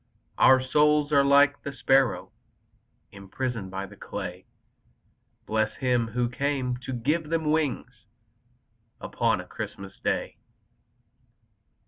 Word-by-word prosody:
Our 130 Hz, 0 st, +7 dB
souls 150 Hz, +3 st, +2 dB
are 140 Hz, -1 st, +5 dB
like 140 Hz, +1 st, +4 dB
the 140 Hz, -, -5 dB
sparrows 130 Hz, -9 st, +1 dB, 0.8 s
Imprisoned 100 Hz, +1 st, -5 dB
in 95 Hz, +1 st, -5 dB
the -, -, -12 dB
clay, 90 Hz, -2 st, -7 dB, 1.0 s
Bless 110 Hz, 0 st, -1 dB
Him 125 Hz, -3 st, +1 dB
who 120 Hz, +2 st, -1 dB
came 130 Hz, 0 st, -2 dB
to 125 Hz, +1 st, -8 dB
give 150 Hz, +6 st, -1 dB
them 160 Hz, -2 st, 0 dB
wings 155 Hz, -4 st, -2 dB, 0.9 s
Upon -, -, 0 dB
a -, -, -7 dB
Christmas 95 Hz, 0 st, -8 dB
Day! -, -, -2 dB
130 Hz, 110 wpm, -26 LUFS, 110-145 Hz, 1.0 s, Our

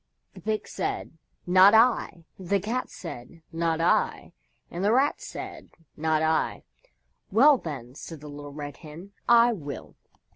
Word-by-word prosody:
The -, -, -13 dB
Pig 215 Hz, -1 st, -2 dB
said, -, -, -4 dB, 0.3 s
"Not 185 Hz, +4 st, +7 dB
I," 220 Hz, -7 st, +3 dB
the 190 Hz, +2 st, 0 dB
Cat 230 Hz, +6 st, -3 dB
said, 165 Hz, 0 st, -10 dB
"Not 165 Hz, -1 st, -1 dB
I," 165 Hz, -, +1 dB, 0.4 s
and 175 Hz, +2 st, -4 dB
the 205 Hz, -, +3 dB
Rat 270 Hz, +5 st, +2 dB
said, -, -, -8 dB, 0.3 s
"Not 155 Hz, 0 st, +1 dB
I." 160 Hz, 0 st, 0 dB, 0.7 s
"Well, 265 Hz, +6 st, +6 dB
then," 130 Hz, -6 st, -7 dB
said 160 Hz, +3 st, -9 dB
the 150 Hz, -, -11 dB
Little 145 Hz, 0 st, -9 dB
Red 145 Hz, -1 st, -7 dB
Hen, 165 Hz, +5 st, -11 dB, 0.2 s
"I 235 Hz, 0 st, +6 dB
will." 145 Hz, -, -8 dB
170 Hz, 145 wpm, -26 LUFS, 150-215 Hz, 0.7 s, Not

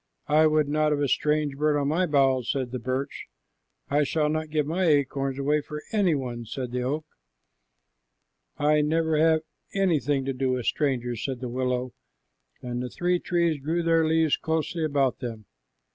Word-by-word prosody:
"I 155 Hz, +1 st, +5 dB
would 155 Hz, -1 st, +2 dB
not 150 Hz, +1 st, +1 dB
have 145 Hz, -2 st, +1 dB
strange 150 Hz, -2 st, +1 dB
birds 150 Hz, +1 st, +1 dB
on 140 Hz, 0 st, 0 dB
my 175 Hz, +4 st, +1 dB
boughs," 135 Hz, -4 st, +2 dB
said 130 Hz, -3 st, -1 dB
the 125 Hz, -, -3 dB
birch. 130 Hz, +3 st, -4 dB, 0.6 s
"I 145 Hz, +1 st, +2 dB
shall 150 Hz, +1 st, 0 dB
not 155 Hz, 0 st, -2 dB
give 150 Hz, -1 st, 0 dB
my 170 Hz, +5 st, -1 dB
acorns 140 Hz, -3 st, +1 dB
away 145 Hz, +2 st, +1 dB
for 150 Hz, +1 st, -8 dB
any 200 Hz, -7 st, +2 dB
one," 120 Hz, -4 st, -4 dB
said 125 Hz, +2 st, -5 dB
the 125 Hz, 0 st, -2 dB
oak. 145 Hz, +5 st, -2 dB, 1.5 s
"I 150 Hz, +1 st, +3 dB
never 160 Hz, +1 st, +1 dB
have 160 Hz, 0 st, +4 dB, 0.3 s
anything 150 Hz, -8 st, +1 dB
to 135 Hz, -, -1 dB
do 130 Hz, 0 st, 0 dB
with 125 Hz, -2 st, -3 dB
strangers," 125 Hz, -5 st, -1 dB
said 130 Hz, -3 st, -3 dB
the 125 Hz, -1 st, -5 dB
willow, 125 Hz, 0 st, -2 dB, 0.7 s
and 125 Hz, 0 st, -3 dB
the 125 Hz, -, -4 dB
three 175 Hz, +6 st, 0 dB
trees 170 Hz, -5 st, 0 dB
drew 165 Hz, +5 st, -1 dB
their 165 Hz, -1 st, +3 dB
leaves 160 Hz, -1 st, +3 dB
closely 160 Hz, +1 st, -2 dB
about 140 Hz, -4 st, +1 dB
them. 115 Hz, -4 st, -6 dB
145 Hz, 175 wpm, -26 LUFS, 130-155 Hz, 1.5 s, I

